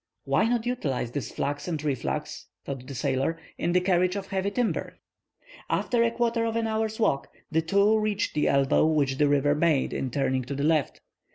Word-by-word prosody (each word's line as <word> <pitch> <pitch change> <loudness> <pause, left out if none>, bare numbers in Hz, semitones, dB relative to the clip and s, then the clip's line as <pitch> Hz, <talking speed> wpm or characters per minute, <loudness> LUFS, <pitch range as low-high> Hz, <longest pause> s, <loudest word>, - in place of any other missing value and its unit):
"Why - - +2
not 235 -1 0
utilize 140 - -2
this 140 +1 -4
flux 145 +3 -3
and 160 -4 -3
reflux," 140 -5 -3 0.2
thought 130 -2 -6
the 135 - -7
sailor, 135 +4 0 0.2
"in 175 - 0
the 180 - +5
carriage 180 0 +2
of 195 -1 -5
heavy 195 0 -1
timber?" 235 +3 -2 0.7
After 240 -2 +1
a 230 - +3
quarter 235 0 0
of 225 0 -1
an 230 0 0
hour's 220 0 -1
walk, 140 -11 +1 0.2
the 160 +1 +2
two 200 +6 +3
reached 210 -2 -1
the 150 - +1
elbow 140 -1 +3
which 140 -4 +1
the 150 - +4
river 145 0 +3
made 150 -2 +1
in 135 - -2
turning 130 0 0
to 140 +2 -4
the 140 - -2
left. 155 -2 +1
165 Hz, 195 wpm, -27 LUFS, 140-215 Hz, 0.7 s, the